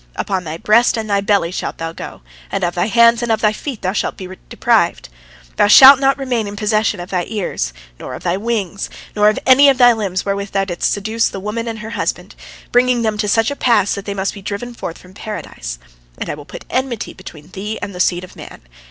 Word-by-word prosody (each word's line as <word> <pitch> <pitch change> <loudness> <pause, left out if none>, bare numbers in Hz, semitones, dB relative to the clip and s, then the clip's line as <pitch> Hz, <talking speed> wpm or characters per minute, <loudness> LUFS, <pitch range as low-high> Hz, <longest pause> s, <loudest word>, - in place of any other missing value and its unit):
Upon 190 -3 -2
thy 155 +1 -5
breast 230 +6 +3
and 220 -1 -3
thy 200 -1 +1
belly 200 -4 +1
shalt - - -4
thou 165 0 -4
go, 165 - -9 0.3
and - - -2
of 175 0 0
thy 175 +2 0
hands 235 +1 +5
and 240 - -2
thy 215 -1 +2
feet 255 +1 -7
thou 185 +1 0
shalt - - -2
be 185 - -7 0.2
deprived. - - +1 0.5
Thou - - +4
shalt 265 +5 +9
not 275 0 +2
remain 250 -6 -2
in 200 - -6
possession 210 -1 0
of 175 +1 -8
thy 180 -2 -1
ears, 190 - -3 0.3
nor - - -7
of - - -10
thy 175 0 0
wings, 200 -3 -3 0.3
nor 210 0 +5
of 215 - -1
any 275 +2 +7
of 270 - +2
thy 245 -2 +7
limbs 195 -5 -3
wherewith 200 0 -3
thou 195 0 +1
didst 175 -3 -1
seduce 220 +3 0
the 195 - -7
woman 215 +4 -4
and 225 -1 -4
her 220 +1 -8
husband, 230 - -3 0.4
bringing 245 -1 +3
them 215 -1 -1
to 210 - 0
such 225 +4 +2
a - - -3
pass 225 -7 +2
that 200 - -6
they 200 - -4
must 195 0 -2
be 200 - -10
driven 210 +5 -5
forth 175 -7 -6
from 180 0 -17
Paradise. 205 - -7 0.4
And - - -4
I - - -3
will 145 -1 -10
put - - -10
enmity 255 -4 -2
between 160 -4 -12
thee 210 +3 -5
and 200 - -6
the 180 - -9
seed 175 0 +1
of 185 - -12
man. - - -11
210 Hz, 235 wpm, -17 LUFS, 190-230 Hz, 0.5 s, shalt